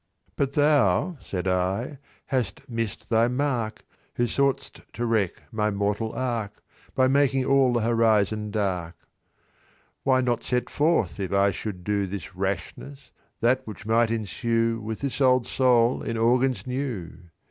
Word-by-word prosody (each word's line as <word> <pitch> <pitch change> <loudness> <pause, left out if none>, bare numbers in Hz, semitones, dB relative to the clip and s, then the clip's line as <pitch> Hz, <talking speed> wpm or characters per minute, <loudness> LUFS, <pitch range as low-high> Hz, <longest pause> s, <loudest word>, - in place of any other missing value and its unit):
"But 140 -1 -1
thou," 145 - +3
said 95 -1 -4
I, 95 +9 -1 0.3
"hast 130 0 -2
miss'd 115 -3 -4
thy 115 +1 +4
mark, 125 -4 -2 0.3
Who 120 - +1
sought'st 135 +1 -1
to 120 - -2
wreck 110 -6 0
my 105 -1 0
mortal 105 +2 -1
ark, 115 -5 -3 0.3
By 130 -1 +4
making 135 -1 +2
all 135 -2 +4
the 120 - +1
horizon 110 -2 +2
dark. 90 -5 -2 1.1
"Why 130 -1 +3
not 120 -2 0
set 125 0 -2
forth, 145 - +1
if 95 -2 -3
I 100 0 +3
should 95 -3 -6
do 100 0 0
This 95 -1 -7
rashness, 100 +8 -5 0.3
that 125 +3 +3
which 105 0 -9
might 115 +1 +3
ensue 115 +1 -1
With 110 0 -5
this 140 0 -3
old 130 -2 +4
soul 125 -2 +3
in 115 - -3
organs 125 +3 +2
new? 120 -10 -5
115 Hz, 145 wpm, -25 LUFS, 100-130 Hz, 1.1 s, thy